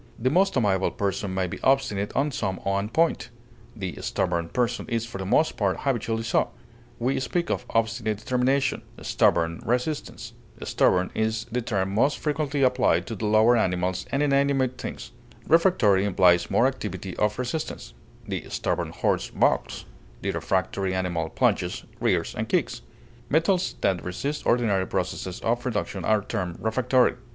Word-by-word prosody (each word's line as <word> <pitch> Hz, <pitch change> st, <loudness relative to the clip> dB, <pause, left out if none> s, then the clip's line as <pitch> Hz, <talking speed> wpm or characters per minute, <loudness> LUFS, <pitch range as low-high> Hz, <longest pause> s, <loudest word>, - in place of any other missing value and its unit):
The 130 Hz, +3 st, 0 dB
most 190 Hz, 0 st, +3 dB
amiable 95 Hz, -5 st, +2 dB
person 100 Hz, 0 st, -2 dB
may 95 Hz, 0 st, 0 dB
be 90 Hz, -, -6 dB
obstinate 105 Hz, -7 st, +1 dB
on 145 Hz, +3 st, +1 dB
some 95 Hz, -7 st, -2 dB
one 100 Hz, +1 st, -1 dB
point; 160 Hz, -5 st, +1 dB, 0.5 s
the 95 Hz, -8 st, -5 dB
stubborn 85 Hz, -2 st, -1 dB
person 120 Hz, +2 st, -1 dB
is 115 Hz, -1 st, -1 dB
for 115 Hz, -4 st, -8 dB
the 95 Hz, -, -4 dB
most 155 Hz, +10 st, +2 dB
part 100 Hz, -3 st, 0 dB
habitually 115 Hz, -4 st, -1 dB
so; 115 Hz, -, +1 dB, 0.5 s
we 125 Hz, +3 st, 0 dB
speak 170 Hz, +6 st, -1 dB
of -, -, -2 dB
obstinate 110 Hz, -1 st, 0 dB
determination, 130 Hz, +5 st, +1 dB, 0.2 s
stubborn 85 Hz, 0 st, +2 dB
resistance. 125 Hz, -1 st, -2 dB, 0.3 s
Stubborn 90 Hz, 0 st, +2 dB
is 110 Hz, 0 st, -1 dB
the 125 Hz, +2 st, 0 dB
term 95 Hz, -5 st, -1 dB
most 135 Hz, +8 st, +2 dB
frequently 150 Hz, -2 st, -1 dB
applied 125 Hz, -1 st, +3 dB
to 115 Hz, -, -5 dB
the 110 Hz, +1 st, -3 dB
lower 110 Hz, +3 st, +5 dB
animals 90 Hz, -3 st, 0 dB
and 140 Hz, +2 st, +1 dB
inanimate 140 Hz, -2 st, +2 dB
things. -, -, -6 dB, 0.4 s
Refractory 155 Hz, -, +4 dB
implies 90 Hz, -3 st, +4 dB
more -, -, +3 dB
activity -, -, -3 dB
of 105 Hz, 0 st, +1 dB
resistance; 125 Hz, -, -4 dB, 0.3 s
the -, -, -4 dB
stubborn -, -, -1 dB
horse -, -, -1 dB
balks; -, -, 0 dB, 0.4 s
the -, -, 0 dB
refractory 95 Hz, 0 st, -1 dB
animal 85 Hz, -3 st, -1 dB
plunges, -, -, 0 dB, 0.2 s
rears, -, -, +1 dB
and -, -, -4 dB
kicks; -, -, 0 dB, 0.5 s
metals 175 Hz, +5 st, +2 dB
that 95 Hz, -2 st, +1 dB
resist 140 Hz, +12 st, -3 dB
ordinary 105 Hz, -6 st, +2 dB
processes 95 Hz, -1 st, -3 dB
of 120 Hz, +1 st, 0 dB
reduction 105 Hz, -6 st, -3 dB
are 110 Hz, +1 st, +2 dB
termed 90 Hz, -6 st, -3 dB
refractory. 125 Hz, +3 st, +2 dB
115 Hz, 150 wpm, -25 LUFS, 95-130 Hz, 0.5 s, lower